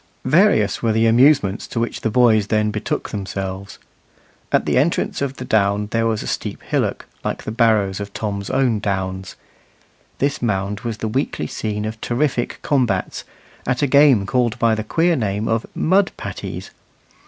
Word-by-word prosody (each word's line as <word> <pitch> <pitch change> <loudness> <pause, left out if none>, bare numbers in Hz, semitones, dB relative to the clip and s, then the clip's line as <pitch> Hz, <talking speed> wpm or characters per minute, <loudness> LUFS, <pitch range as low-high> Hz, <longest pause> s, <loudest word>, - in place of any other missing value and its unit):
Various - - +3
were 115 -1 +1
the 110 +1 +2
amusements 115 -3 +4
to 115 - -3
which 115 - -2
the 110 - 0
boys 110 -3 +4
then 105 0 +1
betook - - -3
themselves. 95 0 -5 0.7
At - - +2
the - - +2
entrance 155 +1 0
of 140 -1 -2
the 125 - -6
down 105 -1 +1
there 115 0 +1
was 110 -2 -1
a - - -6
steep - - -4
hillock, - - -1 0.2
like - - -3
the - - -4
barrows 110 -4 +2
of 100 0 -6
Tom's 100 -2 -4
own 130 -5 +1
downs. 95 -2 -3 0.8
This 140 +2 -1
mound 100 -3 -1
was 115 -1 -4
the 110 - -3
weekly 130 +6 -2
scene 105 -1 -3
of 110 +1 -6
terrific 125 0 -1
combats, 120 -10 0 0.4
at 125 +2 0
a - - +5
game 140 -6 +5
called 120 0 0
by 115 -1 +3
the 110 0 -2
queer 165 +9 +2
name 105 -3 -1
of 115 0 0
"mud 190 +3 +2
patties." - - -6
110 Hz, 170 wpm, -20 LUFS, 100-125 Hz, 0.8 s, a